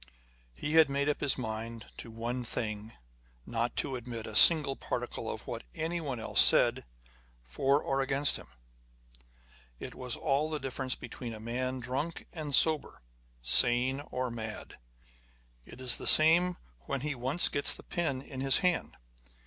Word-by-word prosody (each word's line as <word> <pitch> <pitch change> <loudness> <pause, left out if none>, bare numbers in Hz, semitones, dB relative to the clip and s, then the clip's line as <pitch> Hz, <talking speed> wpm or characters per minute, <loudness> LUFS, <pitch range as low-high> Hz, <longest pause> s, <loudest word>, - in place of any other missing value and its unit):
He 150 - -4
had 160 -2 +6
made 140 +1 -1
up 150 - -1
his 140 -2 +1
mind 115 -1 -6
to 115 - -9
one 120 +2 -4
thing 105 -2 -4
â€" 110 - -14 0.5
not 120 +1 -3
to 135 - -2
admit 120 -2 -7
a 110 - -9
single 150 -3 +7
particle - - -5
of - - -7
what - - -6
anyone 160 -6 -3
else 115 - +4
said - - +5 0.6
for 135 - 0
or 135 0 -1
against 135 +1 +1
him. - - -13 1.3
It - - -8
was 125 -2 -4
all 145 +3 0
the 155 -1 -3
difference 130 -1 -4
between 115 -3 -8
a - - -10
man 130 +3 -3
drunk 135 +7 -4
and 150 -4 -3
sober, 155 - 0 0.4
sane 120 - +3
or 125 -1 -3
mad. 110 -2 -8 0.9
It - - -12
is 125 -2 +1
the - - -3
same 170 +3 +6 0.3
when 140 - -3
ho 150 0 -3
once 135 +8 +3
gets 145 - +3
the - - -12
pen 140 -6 -3
in 130 -2 -8
his 135 -1 +3
hand. 180 -2 -1
130 Hz, 160 wpm, -30 LUFS, 120-145 Hz, 1.3 s, single